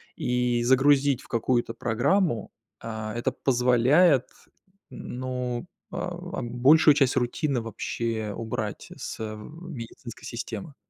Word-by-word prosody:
и 125 -1 0
загрузить 135 +1 +4
в - - -16
какую-то 120 0 0
программу, 120 - +1 0.3
а, 110 -1 -5
это 120 - 0
позволяет, 130 +4 +4 0.7
ну, 125 -1 -4 0.3
а, - - -6 0.2
а, - - -6
большую 140 +6 +5
часть 135 -3 +2
рутины 130 +2 0
вообще 115 -1 -3
убрать 110 -1 -4
с - - -6
медицинской 120 +1 -8
системы. 120 +3 -6
125 Hz, 105 wpm, -26 LUFS, 115-135 Hz, 0.7 s, большую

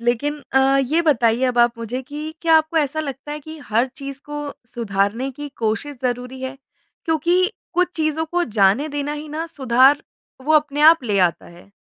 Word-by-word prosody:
लेकिन 265 +5 -1
अ, 270 +1 +4
ये 300 +6 +1
बताइए 245 -5 +2
अब 250 -1 0
आप 240 0 +3
मुझे 230 +3 -4
कि 300 +4 -7
क्या 330 -1 +4
आपको 315 +1 -3
ऐसा 300 +1 0
लगता 280 0 -6
है 300 - -5
कि 315 +2 -10
हर 230 +4 +1
चीज़ 275 -1 -7
को 295 0 -5 0.2
सुधारने 225 +3 -1
की 290 +3 -7
कोशिश 230 +6 -2
ज़रूरी 250 +1 -3
है, 260 +1 -5 0.5
क्योंकि 345 +5 +2 0.2
कुछ 360 0 +2
चीज़ों 310 0 0
को 350 +2 0
जाने 215 - +2
देना 290 0 -3
ही 300 +1 -7
ना 315 +2 -4
सुधार 265 -2 +3 0.4
वो 310 - +2
अपने 295 -1 +2
आप 320 -1 +7
ले 205 -4 0
आता 175 -3 +1
है? 175 +3 -16
275 Hz, 185 wpm, -21 LUFS, 240-310 Hz, 0.5 s, आप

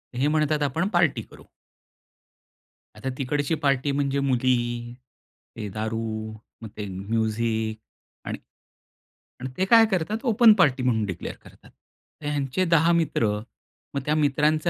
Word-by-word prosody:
हे 130 +4 +1
म्हणतात 150 0 +1
आपण 160 +7 0
पार्टी 170 -4 +3
करू. - - -15 1.5
आता 105 +5 -4
तिकडची 145 +3 -1
पार्टी 140 0 +2
म्हणजे 140 0 0
मुली, 120 -3 0 0.6
ते 105 -2 -5
दारू, 110 +1 -3 0.3
मग 110 - -7
ते 105 - -4
म्युझिक 110 +2 -1 0.5
आणि - - -3 1.0
आणि 130 +1 -5
ते 190 - +2
काय 225 +3 +7
करतात, 190 +4 0
ओपन 230 -2 +6
पार्टी 135 -7 +3
म्हणून 110 -4 +1
डीक्लेर 90 -3 -5
करतात. - - -17 0.5
तर - - -9
ह्यांचे 145 +4 0
10 165 -1 +4
मित्र, 160 -9 +1 0.7
मग 140 - 0
त्या 150 - +1
मित्रांचे 155 +2 +2
135 Hz, 130 wpm, -25 LUFS, 115-155 Hz, 1.5 s, काय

